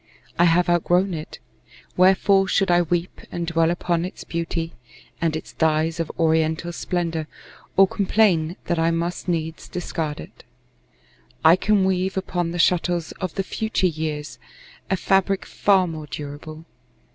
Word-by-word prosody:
I 175 - +6
have 175 +1 +3
outgrown 175 +2 +2
it. 155 -1 -6 0.6
Wherefore 195 +1 +4
should 195 -1 +2
I 175 0 +5
weep 175 +1 -2
And 170 -1 -3
dwell 165 0 +2
upon 175 -1 0
its 180 - -6
beauty, 165 0 -3 0.5
and 165 -2 +1
its 160 - -7
dyes 160 +1 +1
Of 165 - -2
oriental 160 +1 +1
splendor, 170 -3 -2 0.5
or 195 0 +7
complain 185 -5 +2
That 175 - 0
I 165 0 +3
must 170 +2 -2
needs 160 -2 -3
discard 160 -4 -4
it? - - -12 1.0
I 160 +2 +8
can 200 0 +2
weave 190 0 0
Upon 175 -2 -1
the 175 - -4
shuttles 175 -1 +1
of 185 -4 -3
the 195 - -1
future 220 0 -1
years 155 -3 -3 0.5
A 190 - +1
fabric 195 +1 +1
far 195 -2 +3
more 155 -3 -6
durable. 150 +2 -8
170 Hz, 145 wpm, -23 LUFS, 160-185 Hz, 1.0 s, I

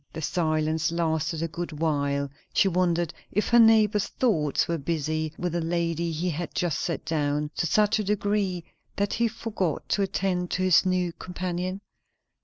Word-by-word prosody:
The 160 - -5
silence 155 -1 0
lasted 160 -1 -1
a - - 0
good 170 +1 -5
while; 140 -3 0 0.2
she - - +5
wondered 175 -2 +1 0.2
if 210 - 0
her 240 - +6
neighbour's 215 -2 +5
thoughts 160 - +1
were 170 -1 -1
busy 155 +1 -2
with 175 -2 -2
the 170 - 0
lady 170 0 -1
he 170 +3 -1
had 165 +3 -5
just 175 -4 0
set 170 - -3
down, 150 -1 -1
to 175 - +1
such 210 +6 +3
a - - 0
degree 200 -3 0 0.3
that 200 0 0
he 235 0 +2
forgot 210 -7 -3
to 205 - +1
attend 185 -2 -1
to 185 - -1
his 185 0 +5
new 180 -2 0
companion? 180 +2 -4
175 Hz, 170 wpm, -26 LUFS, 160-190 Hz, 0.3 s, her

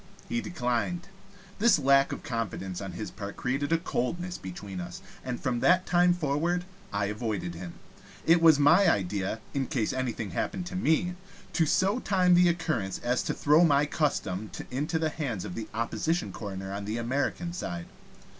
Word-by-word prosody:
He 235 -1 -1
declined. 170 - -2 0.5
This 225 -2 +5
lack 140 -1 +4
of - - -5
confidence 105 -7 -3
on 95 -2 -5
his 105 +5 -5
part 100 -2 -7
created 135 +4 -1
a 165 - +5
coldness 175 +3 -2
between 95 +1 -7
us, 90 0 -7 0.2
and 125 -2 -3
from 125 -2 -1
that 180 +5 +4
time 175 0 +4
forward 175 +2 0 0.3
I 100 0 0
avoided 105 -4 -3
him. 85 0 -8 0.5
It 165 +1 +5
was 160 -3 +7
my 165 +7 +6
idea, 100 +2 -1
in 135 -2 -1
case 115 -5 0
anything 120 -6 -2
happened 180 - -2
to 180 - -6
me, 180 0 +1 0.4
to 165 -2 +2
so 195 +8 +2
time 185 -5 +3
the 175 0 +6
occurrence 155 - -1
as 125 +1 +1
to - - -2
throw 150 +4 +5
my 145 -3 +4
custom 110 - -1 0.2
into 150 +6 -1
the 160 -1 +1
hands 135 - -3
of - - -5
the 110 +3 -5
opposition 160 +9 -1
coroner 95 -2 -6
on 100 0 -4
the 110 +3 -2
American 140 +8 -1
side. 85 - -4
135 Hz, 175 wpm, -28 LUFS, 105-170 Hz, 0.5 s, was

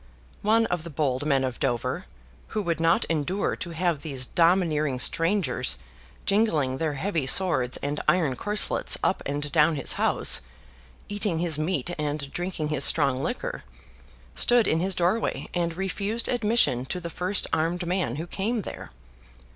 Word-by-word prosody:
One 225 +2 +3
of 175 -6 -2
the 170 - -7
bold 145 -2 -1
men 135 -2 +2
of 130 -2 -3
Dover, 120 -2 -1 0.4
who 215 - -3
would 170 -3 -1
not 165 +1 +3
endure 165 +5 -1
to 170 - -6
have 170 -2 -1
these 135 -4 -2
domineering 160 -4 +2
strangers 165 - +1 0.5
jingling 160 -11 +1
their 155 -3 -1
heavy 160 -2 -1
swords 135 -7 +2
and 145 +1 -2
iron 160 -8 +2
corselets 210 +9 +1
up - - +1
and 145 +1 -3
down 155 +3 +4
his 135 - +3
house, - - +3 0.7
eating 205 -4 -1
his 165 -3 0
meat 160 0 -1
and 145 -2 -3
drinking 175 -4 -3
his 145 -3 +1
strong 130 -1 +3
liquor, - - -4 0.7
stood 240 - +3
in 160 - +2
his 185 +2 +1
doorway 180 +7 0
and 170 -1 -1
refused 200 +4 -1
admission 225 - +2
to 180 - -3
the 170 -1 -7
first 185 +4 +1
armed 170 +3 0
man 175 -9 -1
who 160 +3 -4
came 210 +5 -2
there. - - -8
165 Hz, 155 wpm, -26 LUFS, 145-190 Hz, 0.7 s, down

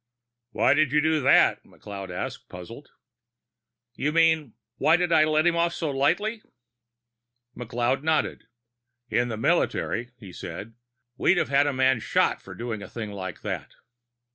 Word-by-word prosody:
"Why 130 - +3
did 155 -1 +2
you 150 - +4
do 155 0 +2
that?" 130 - +4
McLeod 100 -2 -9
asked, 90 - -6
puzzled. 115 +11 -10 1.0
"You 145 +4 -1
mean, 160 -5 +2 0.2
why 160 +2 +4
did 175 -1 -1
I 155 -2 +5
let 155 +1 +2
him 170 -1 +3
off 170 0 +1
so 160 -4 -2
lightly?" 180 +12 0 1.1
McLeod 120 +2 -1
nodded. 160 +1 0 0.7
"In 120 - +2
the 110 -2 -4
military," 120 +2 0
he 100 -7 -12
said, 95 +8 -8 0.4
"we'd 175 - +3
have 175 - 0
a 145 +1 +4
man 130 -2 +2
shot - - +1
for - - -11
doing 115 -3 -5
a - - -9
thing 110 -3 -6
like 95 -2 -7
that." - - -5
135 Hz, 150 wpm, -25 LUFS, 115-160 Hz, 1.1 s, I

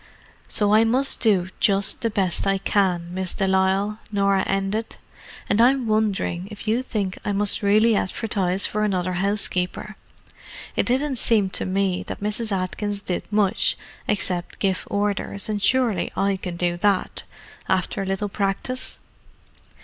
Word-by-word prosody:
"So 205 -1 +1
I 220 +1 +6
must 255 +5 +4
do 190 -5 +3
just 200 -1 +3
the 230 - +1
best 195 -3 0
I 195 0 +2
can, 180 -3 0
Miss 185 -1 -3
de 195 - 0
Lisle," 190 +2 +1
Norah 200 -2 +2
ended. 195 +3 -2 0.5
"And 205 +3 +2
I'm 255 +1 +4
wondering 210 -4 0
if 210 0 -10
you 225 +3 +2
think 205 -7 -3
I 205 - -1
must 200 0 +1
really 215 +2 +4
advertise 195 -2 0
for 215 0 -1
another 185 -3 -1
housekeeper. 195 +1 +1 0.8
It - - 0
didn't 265 +2 0
seem 205 -5 +2
to - - -1
me 190 -1 0
that - - -6
Mrs. 210 +2 -2
Atkins 200 +2 -2
did 185 +1 -4
much 205 -2 +1 0.3
except 180 -3 -1
give 190 -2 -1
orders, 200 -1 -1
and 210 -1 -2
surely 240 0 +1
I 195 +1 +1
can 180 -2 -6
do 175 0 -1
that, 195 +1 0 0.5
after 190 +1 0
a - - -3
little 195 +2 -1
practice." 200 +6 -3
200 Hz, 150 wpm, -23 LUFS, 190-215 Hz, 0.8 s, I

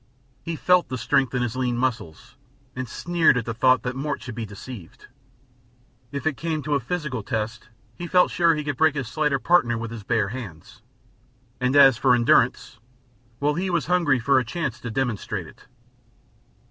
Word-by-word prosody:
He 165 - -4
felt 180 +2 +2
the 130 - -3
strength 135 -1 +1
in 125 - +1
his 120 -1 -3
lean 125 -2 -1
muscles, 120 - -3 0.4
and 130 -2 -5
sneered 170 -3 +2
at 120 - -2
the 115 - -3
thought 130 +2 +3
that 125 0 -3
Mort 140 +1 -3
should 125 - -8
be 115 -1 -5
deceived. 100 -2 -11 1.1
If 140 +1 -5
it 155 -4 0
came 160 -2 -3
to 150 +1 -2
a 140 - +2
physical 140 -2 -4
test 110 +3 -4 0.3
he 175 - -4
felt 180 +1 +3
sure 170 -2 +3
he 150 - -3
could 145 -3 -3
break 160 0 +3
his 135 -5 -3
slighter 150 +1 0
partner 125 -6 +2
with 115 0 -5
his 115 -2 -7
bare 105 0 0
hands, 100 -10 -9 0.8
and 125 +1 0
as 135 -4 +7
for 125 -2 +4
endurance 120 -1 +2 0.6
well, 145 +1 +1
he 185 +4 -2
was 170 -4 0
hungry 170 -6 +2
for 130 +3 +3
a - - -1
chance 125 -1 -4
to 120 - -6
demonstrate 120 -3 -3
it. - - -17
130 Hz, 185 wpm, -24 LUFS, 120-150 Hz, 1.1 s, as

